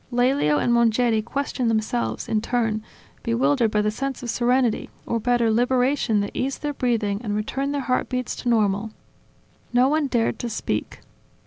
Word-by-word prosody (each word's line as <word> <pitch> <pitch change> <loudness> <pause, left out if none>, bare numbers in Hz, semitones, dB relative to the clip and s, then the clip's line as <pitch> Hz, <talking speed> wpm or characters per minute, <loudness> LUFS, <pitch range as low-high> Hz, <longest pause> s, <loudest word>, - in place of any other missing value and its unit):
Lelio 245 - +2
and 240 - +2
Mongeri 235 -1 +3
questioned 255 +1 -2
themselves, 120 - -1
in 215 - 0
turn, 225 -2 0 0.4
bewildered 240 +1 +2
by 210 0 +1
the 210 - +1
sense 270 +3 -4
of 240 - -2
serenity, 245 -1 +1 0.2
or 230 - -1
better 240 -1 +2
liberation 245 -1 +2
that 200 - -3
eased 270 +3 -2
their 295 0 -1
breathing 225 -6 0
and 210 -3 -2
returned 270 +6 -2
their 285 -1 -1
heartbeats 255 -1 -1
to 245 - -2
normal. 210 -2 +1 0.8
No 250 +2 +5
one 305 -1 +1
dared 230 -3 0
to 240 - -3
speak. 220 - -3
240 Hz, 160 wpm, -23 LUFS, 220-255 Hz, 0.8 s, No